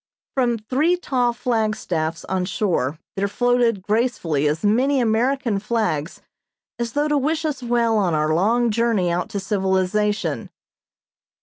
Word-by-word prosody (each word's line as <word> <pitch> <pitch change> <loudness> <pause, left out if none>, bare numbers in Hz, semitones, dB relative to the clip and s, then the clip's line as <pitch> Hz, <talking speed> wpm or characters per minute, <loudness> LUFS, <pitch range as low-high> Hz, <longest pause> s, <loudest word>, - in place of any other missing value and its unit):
From 245 -3 +1
three 275 +11 +1
tall 250 -8 0
flagstaffs 215 -9 -2
on 185 0 -1
shore 180 -7 -1 0.2
there 200 +1 0
floated 240 -2 +1
gracefully 205 - 0
as 150 +4 -1
many 255 +7 +3
American 235 0 +1
flags 210 -8 -2 0.6
as 235 -1 -3
though 290 +1 +1
to 295 -1 +2
wish 315 +4 -1
us 295 -4 -2
well 235 -2 +1
on 180 -5 +1
our 155 0 +1
long 230 +7 +2
journey 220 -5 +1
out 175 +1 -2
to 200 - -3
civilization. 195 +2 0
220 Hz, 135 wpm, -22 LUFS, 190-245 Hz, 0.6 s, many